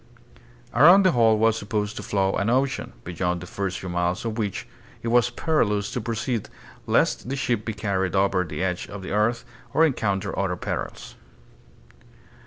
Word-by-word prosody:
Around 175 - +7
the 185 - +5
whole 115 -3 +4
was 110 0 +3
supposed 105 0 -2
to - - -4
flow 95 -1 0
an 100 +2 0
ocean, 130 +3 0
beyond 90 0 -2
the 90 - -8
first 95 +1 -3
few 95 - -6
miles 90 +3 -1
of 115 -2 -2
which 105 -3 -3 0.4
it 115 - -1
was 120 0 +4
perilous 105 -11 0
to 125 - -3
proceed 115 0 -2 0.4
lest - - +1
the 135 - -1
ship 120 -5 -1
be 110 - -2
carried 100 -3 -1
over 95 -1 +2
the 90 +2 -4
edge 90 -1 -2
of 100 -1 -8
the - - -6
earth 105 +4 +1 0.3
or 160 - +6
encounter 100 -8 -1
other 95 -2 0
perils. - - -5
105 Hz, 175 wpm, -24 LUFS, 95-115 Hz, 0.4 s, Around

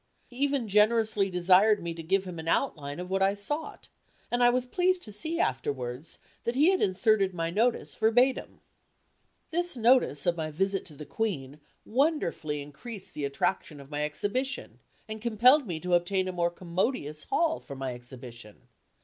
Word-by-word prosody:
He 245 - -15
even 275 -3 0
generously 210 -1 +3
desired 185 +4 +4
me 170 -1 -3
to 165 - -7
give 190 +4 0
him 175 -3 -7
an 160 - -7
outline 150 - -1
of 180 +1 -6
what 195 0 +1
I 195 +1 +3
sought, 295 +10 -5 0.4
and 240 0 +2
I 240 - +7
was 250 +1 +1
pleased 360 +6 +1
to 210 - -5
see 320 +10 -3
afterwards, 130 - -2 0.3
that 235 - -2
he 305 +7 +5
had 380 - 0
inserted 195 -1 +2
my 165 -1 -2
notice 230 +6 0
verbatim. 245 +4 +2 0.9
This 350 -3 -1
notice 235 - +3
of 175 -1 +2
my 155 -1 -2
visit 195 +5 -1
to 155 - -7
the 150 - -9
Queen 150 -8 -3 0.3
wonderfully 220 - 0
increased 185 +9 -9
the 150 - -3
attraction 145 +2 -2
of 140 +1 -13
my 145 0 -2
exhibition 230 - -3 0.3
and 220 0 -6
compelled 240 +5 +4
me 170 -4 -3
to 180 +2 -2
obtain 185 +2 +2
a - - -2
more 175 -1 0
commodious 170 - -3
hall 325 -1 +1
for 140 - -9
my 135 -1 -4
exhibition. 120 -3 -12
195 Hz, 175 wpm, -28 LUFS, 155-240 Hz, 0.9 s, I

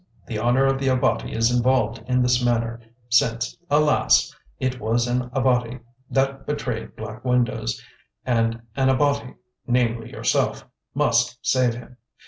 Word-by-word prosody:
The 110 -3 -4
honour 120 +4 +3
of 135 0 +1
the 135 - -1
Abati 125 -3 +1
is 115 +2 +1
involved 115 -2 +1
in 125 0 +2
this 125 0 +2
manner, 115 -1 0 0.3
since, 115 -1 +1
alas! 150 -1 +3 0.2
it 130 -1 -2
was 115 +2 0
an 125 0 -1
Abati 125 -2 +1 0.3
that 135 0 -1
betrayed 125 -6 -4
Black 110 +2 -8
Windows, 125 - 0 0.5
and 115 -2 0
an 130 -1 +2
Abati—namely, 125 -4 -1
yourself—must - - -1
save 125 -3 +2
him. 125 +1 -12
125 Hz, 125 wpm, -23 LUFS, 115-130 Hz, 0.5 s, honour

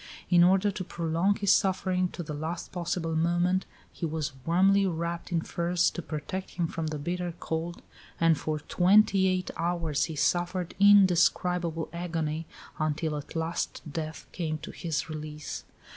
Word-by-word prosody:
In 175 -1 +7
order 190 +3 +4
to 190 - -5
prolong 170 +3 0
his 200 -2 +2
suffering 185 -2 +2
to 175 - -6
the 155 -1 -6
last 160 +3 -4
possible 170 -2 -2
moment, 175 +3 +1 0.3
he - - -11
was 155 -2 -1 0.2
warmly 195 +3 +4
wrapped 170 0 -3
in 170 -2 +1
furs, 170 +1 +1
to 175 - -5
protect 160 +5 -5
him 170 -2 0
from 165 -1 -3
the 155 -1 -3
bitter 175 +3 -3
cold, 165 +2 -4 0.4
and 165 -1 +5
for 155 +1 -2
twenty 190 +4 +4
eight 185 0 0
hours 165 -3 0
he 160 -1 -6
suffered 175 +3 0
indescribable 180 -4 +4
agony, 165 -2 -3 0.3
until 155 0 -1
at 145 +2 -7
last 165 +1 -2
death 155 +1 -5
came 155 -3 -2
to 155 - -8
his 160 -3 -3
release. 150 -1 -6
170 Hz, 155 wpm, -28 LUFS, 160-180 Hz, 0.4 s, In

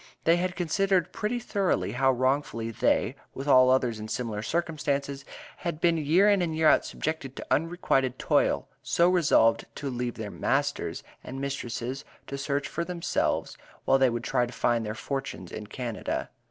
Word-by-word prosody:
They 165 +1 +4
had 180 +1 -1
considered 185 +2 +1
pretty 215 +3 -1
thoroughly 205 -6 0
how 135 +2 +3
wrongfully 130 -3 0
they, - - +1 0.2
with 135 +2 -5
all 130 -2 +7
others 125 -4 +2
in 110 - -6
similar 110 -2 -3
circumstances, 140 -1 -2 0.3
had 170 -3 -4
been 170 0 +3
year 160 +7 +4
in 200 -2 +4
and 160 -3 -1
year 160 -1 +4
out - - +5
subjected 145 -4 -4
to - - -7
unrequited 140 -6 +1
toil - - +1
so 170 - +3
resolved 150 -10 +3
to 140 -2 -4
leave 120 -1 -3
masters 105 -2 -1 0.2
and 135 +1 -7
mistresses 135 -1 -4 0.2
to 140 - -6
shift 140 +1 -1
for 170 - -3
themselves, 170 -1 -1 0.3
while 135 - +4
they 130 -1 +5
would 120 0 -3
try 125 -1 +1
their 115 -2 0
fortunes 135 -9 -5
in 105 - -7
Canada. 120 0 -4
140 Hz, 160 wpm, -27 LUFS, 125-165 Hz, 0.3 s, all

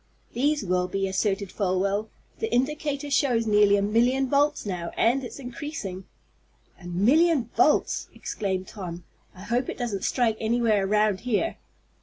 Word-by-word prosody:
"These 290 +1 +1
will 180 0 +1
be," 195 +1 -1
asserted 195 0 -1
Folwell. 200 +2 0 0.3
"The 445 - -2
indicator 290 +2 -1
shows 250 -4 +2
nearly 210 -1 +5
a 200 - 0
million 245 +6 +2
volts 285 0 +1
now, 175 -4 -3
and 250 +4 +2
it's 245 - -7
increasing." 245 -8 -6 0.8
"A - - -13
million 260 - +3
volts!" - - +2
exclaimed 190 -2 -3
Tom. 175 -4 -7 0.3
"I 185 - -11
hope 240 +4 -1
it - - -5
doesn't 225 -6 -3
strike 230 -4 +1
anywhere 220 -3 +1
around 210 -1 +2
here." 250 - -1
220 Hz, 145 wpm, -26 LUFS, 195-260 Hz, 0.8 s, nearly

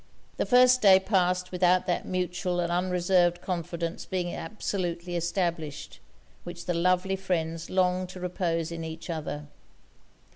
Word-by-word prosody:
The - - -1
first 250 0 +6
day 190 -2 +8
passed 185 -2 +1
without 180 0 +3
that 180 - -1
mutual 180 0 -1
and 170 -1 0
unreserved 175 0 +2
confidence 170 -1 -4
being 180 -2 -3
absolutely 175 -2 -4
established, 170 -3 -2 0.4
which 175 0 -8
the 175 - 0
lovely 180 +3 +2
friends 165 -3 -2
longed 185 0 +1
to 185 - -9
repose 170 -2 -2
in 165 -1 -5
each 160 +1 -6
other. 150 -2 -4
180 Hz, 135 wpm, -27 LUFS, 170-185 Hz, 0.4 s, day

